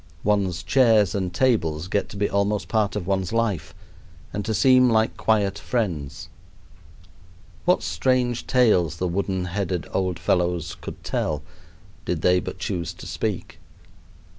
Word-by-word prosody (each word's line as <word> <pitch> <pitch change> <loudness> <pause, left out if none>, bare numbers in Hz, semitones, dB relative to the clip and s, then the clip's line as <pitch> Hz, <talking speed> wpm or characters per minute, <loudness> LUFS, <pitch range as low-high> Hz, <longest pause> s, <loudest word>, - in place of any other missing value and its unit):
One's 95 -4 +1
chairs 110 -7 +4
and 95 -3 -2
tables 90 -8 +1
get 100 +2 -1
to 100 - -9
be 100 0 +1
almost 100 +1 0
part 105 -3 0
of 100 -4 -3
one's 95 -1 -1
life 110 -9 -1 0.6
and 105 - -2
to 110 - -1
seem 130 0 +5
like 110 -1 +2
quiet 105 -2 +1
friends. 90 - -3 1.4
What - - +3
strange 120 +6 0
tales 90 - +3
the 90 - -1
wooden 95 0 -1
headed 90 -1 -2
old 95 -3 0
fellows 85 -2 0
could - - -8
tell 75 -1 -2 0.6
did 85 -3 -3
they 90 0 +4
but - - -6
choose 90 -3 -3
to - - -11
speak! - - -4
100 Hz, 140 wpm, -24 LUFS, 90-110 Hz, 1.4 s, seem